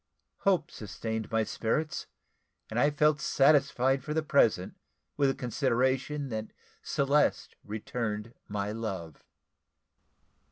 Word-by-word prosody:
Hope 185 Hz, -5 st, +1 dB
sustained 110 Hz, +1 st, -5 dB
my 110 Hz, 0 st, +2 dB
spirits, 150 Hz, +9 st, -2 dB, 0.6 s
and 115 Hz, -, 0 dB
I 145 Hz, -, +5 dB
felt 150 Hz, 0 st, +2 dB
satisfied 135 Hz, -3 st, +3 dB
for 150 Hz, +1 st, -4 dB
the 160 Hz, -, +1 dB
present 115 Hz, -11 st, +3 dB, 0.4 s
with 140 Hz, -2 st, +3 dB
the 135 Hz, -, 0 dB
consideration 130 Hz, +3 st, 0 dB
that 110 Hz, -1 st, -3 dB, 0.3 s
Celeste 140 Hz, +2 st, +1 dB
returned 110 Hz, +1 st, -4 dB
my 100 Hz, 0 st, -2 dB
love. 95 Hz, -8 st, -5 dB
125 Hz, 110 wpm, -30 LUFS, 110-145 Hz, 0.6 s, I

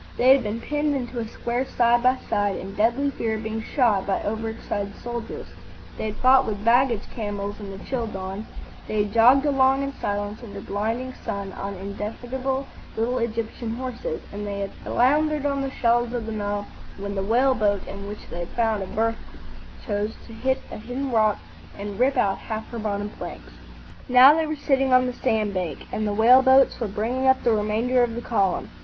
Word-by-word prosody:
They 250 Hz, -, +4 dB
had 270 Hz, 0 st, +7 dB
been 215 Hz, 0 st, -3 dB
penned 295 Hz, +3 st, -1 dB
into 245 Hz, -2 st, -3 dB
a 225 Hz, -, -3 dB
square 240 Hz, +3 st, -2 dB
side 240 Hz, -2 st, +2 dB
by 255 Hz, +1 st, +3 dB
side, 205 Hz, -3 st, +1 dB
in 195 Hz, +2 st, -6 dB
deadly 235 Hz, +7 st, +2 dB
fear 225 Hz, -4 st, -2 dB
of 220 Hz, -, -5 dB
being 220 Hz, 0 st, -3 dB
shot 220 Hz, -6 st, +1 dB
by 195 Hz, -, 0 dB
over 220 Hz, +2 st, -2 dB
excited 205 Hz, -2 st, -4 dB
soldiers; 240 Hz, -1 st, -6 dB, 0.5 s
they -, -, -4 dB
had 215 Hz, -1 st, -3 dB
fought 260 Hz, +1 st, +5 dB
with 205 Hz, 0 st, -4 dB
baggage 235 Hz, -2 st, +4 dB
camels 205 Hz, -2 st, -4 dB
in 205 Hz, -2 st, -7 dB
the 195 Hz, -, -7 dB
chill 245 Hz, -4 st, -2 dB
dawn; 195 Hz, +1 st, -6 dB, 0.4 s
they 215 Hz, -1 st, +1 dB
had 205 Hz, 0 st, -6 dB
jogged 250 Hz, +5 st, +6 dB
along 270 Hz, -1 st, +3 dB
in 275 Hz, 0 st, -3 dB
silence 205 Hz, 0 st, -3 dB
under 230 Hz, -4 st, -8 dB
blinding 225 Hz, +5 st, -3 dB
sun 200 Hz, -1 st, -4 dB
on 200 Hz, 0 st, -5 dB
indefatigable 245 Hz, +7 st, -4 dB, 0.3 s
little 245 Hz, +3 st, 0 dB
Egyptian 230 Hz, 0 st, -3 dB
horses; 260 Hz, -, -4 dB
and 205 Hz, +1 st, -5 dB
they 200 Hz, 0 st, -3 dB
had 195 Hz, -, -3 dB
floundered 295 Hz, +4 st, +2 dB
on 280 Hz, -1 st, 0 dB
the 270 Hz, -, -2 dB
shallows 240 Hz, -1 st, +1 dB
of 240 Hz, -3 st, -2 dB
the 225 Hz, -, -4 dB
Nile 205 Hz, -1 st, -2 dB, 0.3 s
when 200 Hz, 0 st, -4 dB
the 195 Hz, -, -2 dB
whale 245 Hz, +7 st, +3 dB
boat 205 Hz, -4 st, 0 dB
in 200 Hz, 0 st, -7 dB
which 210 Hz, +1 st, -8 dB
they 170 Hz, -, -5 dB
had 175 Hz, -, -4 dB
found 225 Hz, -3 st, +1 dB
a 190 Hz, -, -4 dB
berth 225 Hz, +3 st, 0 dB, 0.7 s
chose 210 Hz, 0 st, -2 dB
to 230 Hz, -, -12 dB
hit 260 Hz, +4 st, -1 dB
a -, -, -6 dB
hidden 255 Hz, +4 st, -4 dB
rock 215 Hz, -2 st, +3 dB, 0.4 s
and 205 Hz, 0 st, -6 dB
rip 265 Hz, +2 st, +3 dB
out 195 Hz, -5 st, +2 dB
half 220 Hz, 0 st, -5 dB
her 235 Hz, -, -5 dB
bottom 205 Hz, -1 st, -2 dB
planks. -, -, -9 dB, 0.6 s
Now 255 Hz, +3 st, +9 dB
they 320 Hz, 0 st, +1 dB
were 310 Hz, -, -2 dB
sitting 270 Hz, -2 st, +1 dB
on 255 Hz, 0 st, +6 dB
the 250 Hz, -, -2 dB
sand 220 Hz, -5 st, 0 dB
bank, 180 Hz, -3 st, -3 dB
and 215 Hz, 0 st, -1 dB
the -, -, 0 dB
whale 235 Hz, +5 st, +7 dB
boats 265 Hz, 0 st, +5 dB
were 230 Hz, -, -1 dB
bringing 230 Hz, +6 st, -1 dB
up 260 Hz, 0 st, +4 dB
the 235 Hz, -, +3 dB
remainder 220 Hz, +4 st, +1 dB
of 235 Hz, -2 st, +1 dB
the 240 Hz, -, -4 dB
column. 200 Hz, -6 st, 0 dB
225 Hz, 205 wpm, -24 LUFS, 205-255 Hz, 0.7 s, Now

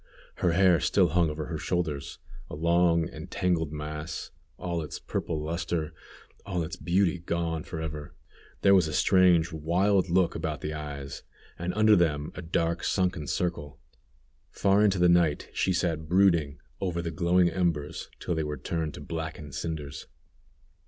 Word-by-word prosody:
Her 85 Hz, -2 st, +1 dB
hair 90 Hz, -2 st, +5 dB
still -, -, +3 dB
hung 85 Hz, -2 st, +2 dB
over 75 Hz, 0 st, -4 dB
her 80 Hz, -1 st, -4 dB
shoulders, 80 Hz, -3 st, -2 dB, 0.3 s
a -, -, -6 dB
long 85 Hz, +1 st, +3 dB
and 75 Hz, -2 st, -9 dB
tangled 90 Hz, -5 st, 0 dB
mass, 75 Hz, +1 st, -5 dB, 0.3 s
all 85 Hz, -2 st, -3 dB
its 75 Hz, -, -6 dB
purple 80 Hz, -, -3 dB
luster, 85 Hz, 0 st, -2 dB, 0.5 s
all 90 Hz, -4 st, -2 dB
its 80 Hz, +1 st, -5 dB
beauty 90 Hz, +2 st, +1 dB
gone 85 Hz, -1 st, -2 dB
forever. 75 Hz, -3 st, -6 dB, 0.5 s
There 100 Hz, -, +6 dB
was 90 Hz, -4 st, +5 dB
a 75 Hz, -, -4 dB
strange, 90 Hz, -3 st, +4 dB
wild 90 Hz, +5 st, +2 dB
look 90 Hz, 0 st, +3 dB
about 80 Hz, -2 st, -3 dB
the 75 Hz, -, -3 dB
eyes, 70 Hz, -3 st, -6 dB, 0.4 s
and 85 Hz, +1 st, -2 dB
under 110 Hz, 0 st, +6 dB
them 75 Hz, -5 st, +1 dB
a -, -, -7 dB
dark, 85 Hz, 0 st, -1 dB
sunken 90 Hz, -5 st, 0 dB
circle. 85 Hz, -5 st, -2 dB, 0.7 s
Far 100 Hz, +2 st, +3 dB
into 100 Hz, -2 st, +3 dB
the 90 Hz, 0 st, +4 dB
night 85 Hz, -4 st, +2 dB
she 95 Hz, -, +1 dB
sat 85 Hz, -3 st, -1 dB
brooding 85 Hz, -6 st, +3 dB, 0.2 s
over 85 Hz, -3 st, -2 dB
the 85 Hz, -, -3 dB
glowing 85 Hz, +2 st, +3 dB
embers, 85 Hz, -4 st, -2 dB
till -, -, -2 dB
they 80 Hz, -1 st, -1 dB
were 75 Hz, -1 st, -4 dB
turned 80 Hz, +2 st, -3 dB
to -, -, -9 dB
blackened 80 Hz, -1 st, -6 dB
cinders. 75 Hz, -4 st, -5 dB
85 Hz, 160 wpm, -28 LUFS, 75-90 Hz, 0.7 s, There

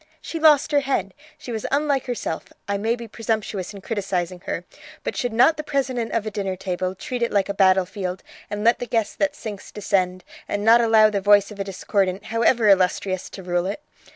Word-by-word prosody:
She 330 Hz, -, -6 dB
lost 305 Hz, -2 st, +5 dB
her 290 Hz, -, +4 dB
head; 265 Hz, -8 st, -1 dB, 0.2 s
she 245 Hz, -, -8 dB
was 220 Hz, -2 st, -3 dB
unlike 280 Hz, -2 st, +1 dB
herself 235 Hz, -9 st, -3 dB, 0.2 s
I 200 Hz, -, 0 dB
may 220 Hz, +4 st, 0 dB
be 235 Hz, -1 st, -8 dB
presumptuous 215 Hz, -4 st, -3 dB
in 200 Hz, -2 st, -10 dB
criticizing 185 Hz, -4 st, -2 dB
her, -, -, -3 dB, 0.4 s
but -, -, -3 dB
should 245 Hz, -2 st, -1 dB
not 250 Hz, +8 st, +4 dB
the 305 Hz, -, -4 dB
president 260 Hz, -5 st, -1 dB
of 230 Hz, -2 st, 0 dB
a 215 Hz, -, -3 dB
dinner 195 Hz, -2 st, -2 dB
table 185 Hz, 0 st, -3 dB
treat 245 Hz, +5 st, -5 dB
it 235 Hz, -, +1 dB
like 200 Hz, -1 st, +1 dB
a -, -, 0 dB
battlefield, 190 Hz, -1 st, +1 dB, 0.3 s
and 205 Hz, 0 st, -4 dB
let 235 Hz, +2 st, +4 dB
the 245 Hz, -, -4 dB
guest 225 Hz, -2 st, -1 dB
that 295 Hz, -1 st, +1 dB
sinks 210 Hz, -6 st, -8 dB
descend, 185 Hz, -3 st, -1 dB, 0.2 s
and 205 Hz, 0 st, -2 dB
not 230 Hz, +1 st, +7 dB
allow 220 Hz, -2 st, +5 dB
the 200 Hz, -1 st, -1 dB
voice 205 Hz, +1 st, +5 dB
of 205 Hz, -, -11 dB
a -, -, 0 dB
discordant, 195 Hz, 0 st, -1 dB
however 230 Hz, 0 st, +2 dB
illustrious, 185 Hz, -1 st, +2 dB
to 190 Hz, -, -9 dB
rule 175 Hz, 0 st, 0 dB
it? 200 Hz, -, -3 dB
210 Hz, 210 wpm, -23 LUFS, 190-235 Hz, 0.4 s, not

